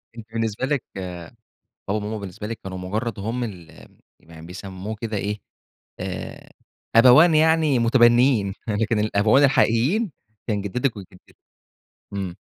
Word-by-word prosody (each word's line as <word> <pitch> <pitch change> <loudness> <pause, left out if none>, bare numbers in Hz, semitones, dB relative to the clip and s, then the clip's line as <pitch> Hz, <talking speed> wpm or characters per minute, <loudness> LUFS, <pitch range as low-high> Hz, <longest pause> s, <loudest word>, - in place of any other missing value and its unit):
أنتِ 115 - -9
بالنسبة 115 +2 -1
لِك، 140 -3 -1
بابا 90 -2 -6 0.7
وماما 105 +1 -2
بالنسبة 100 +1 -7
لِك 115 0 -6
كانوا 95 -1 -6
مجرد 105 +4 -3
هم 115 +5 -3
ال 90 -7 -9 0.3
يعني 80 0 -14
بيسموه 95 +3 -7
كده 110 -2 -3
إيه 105 +1 -3 0.6
آآ، - - -6 0.5
أبوان 135 +8 +7
يعني 155 -4 +3
متبنيين، 120 -3 +4
لكن 110 +1 0
الأبوان 110 +6 +3
الحقيقيين 140 - +2 0.4
كان 105 -3 -1
جدتِك 115 +4 -2
وجدِك، 95 -1 -14 0.8
إمم. 95 -3 -4
110 Hz, 125 wpm, -23 LUFS, 100-125 Hz, 0.8 s, أبوان